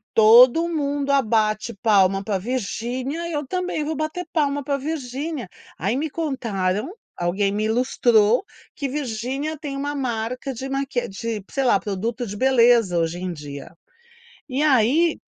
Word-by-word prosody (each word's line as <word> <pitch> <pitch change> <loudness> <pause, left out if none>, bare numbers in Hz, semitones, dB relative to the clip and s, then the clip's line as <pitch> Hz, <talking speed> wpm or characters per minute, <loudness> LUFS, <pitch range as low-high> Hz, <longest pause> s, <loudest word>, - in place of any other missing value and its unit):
"Todo 245 +9 +7
mundo 285 -3 -1
abate 220 -4 +1
palma 195 -2 +3
para 200 -3 -1
Virgínia, 255 - -3
eu 295 -2 -2
também 365 -3 -2
vou 310 +1 -3
bater 310 +4 -3
palma 285 -3 +1
para 280 0 -1
Virgínia". 285 - -4 0.3
Aí 200 +8 -1
me 305 +3 -1
contaram, 230 - -2 0.2
alguém 190 +3 0
me 210 +1 -1
ilustrou, 235 - +3 0.3
que 280 -2 -3
Virginia 270 +3 -3
tem 280 -3 -5
uma 285 +1 -2
marca 250 0 -3
de 260 +3 -6
maqui 270 -2 -2
de, 210 +1 -5
sei 270 - 0
lá, 240 -6 +4
produto 225 +5 -3
de 205 -1 -6
beleza, 235 -6 +4
hoje 165 +1 -1
em 185 -1 -3
dia. 145 -2 -9 0.7
E 270 +2 -2
aí 300 +4 +3
250 Hz, 145 wpm, -22 LUFS, 215-285 Hz, 0.7 s, Todo